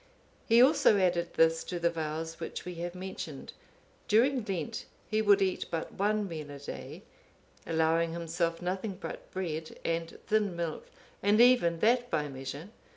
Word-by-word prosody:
He 235 +1 +7
also 280 -6 +5
added 175 -2 +1
this 165 0 +4
to 180 - -4
the 170 0 +1
vows 160 0 -4
which 165 - -6
we 180 - -5
have 175 +1 -4
mentioned: 190 +1 -7 0.5
during 245 +3 +3
Lent, 175 -6 -3 0.3
he 215 0 +2
would 200 -2 +5
eat 190 -1 -1
but 165 -1 -3
one 210 +1 0
meal 155 -4 -6
a 145 - -8
day, 145 - -8 0.6
allowing 165 0 +2
himself 170 0 -2
nothing 190 +2 -3
but - - -7
bread 160 -4 -4
and 165 0 -2
thin 210 -4 +1
milk, 170 -2 -4 0.3
and 205 +2 +3
even 240 -10 +5
that 245 +2 +3
by 150 -8 0
measure. 135 +6 -7
175 Hz, 155 wpm, -30 LUFS, 165-205 Hz, 0.6 s, He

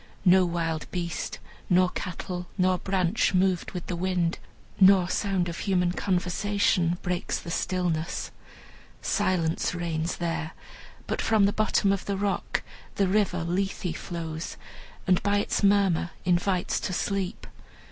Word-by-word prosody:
No 185 0 +6
wild 165 -2 -2
beast, 170 -3 -3 0.3
nor 180 0 +5
cattle, 180 -1 -5
nor 185 -1 +2
branch 190 +1 +1
moved 185 -1 +2
with 180 -2 -5
the 180 - -3
wind, 175 -1 0 0.4
nor 190 -2 +7
sound 190 -2 0
of 170 - -5
human 180 -3 +1
conversation, 180 -1 +1
breaks 180 -1 -1
the 170 - -7
stillness. 175 -2 -1 0.7
Silence 170 -1 0
reigns 170 -1 -2
there; 165 -2 -2 0.5
but - - -2
from 220 -3 +4
the 200 - +2
bottom 215 -2 +2
of 195 - -3
the 200 -1 -1
rock 200 0 -1 0.3
the 195 - +2
River 190 -3 +1
Lethe 180 -1 -2
flows, 165 -2 -5 0.5
and 185 -2 +3
by 205 +1 +2
its 205 - 0
murmur 195 -4 +3 0.2
invites 180 +1 +1
to 185 - -3
sleep. 195 0 -2
180 Hz, 135 wpm, -27 LUFS, 170-195 Hz, 0.7 s, nor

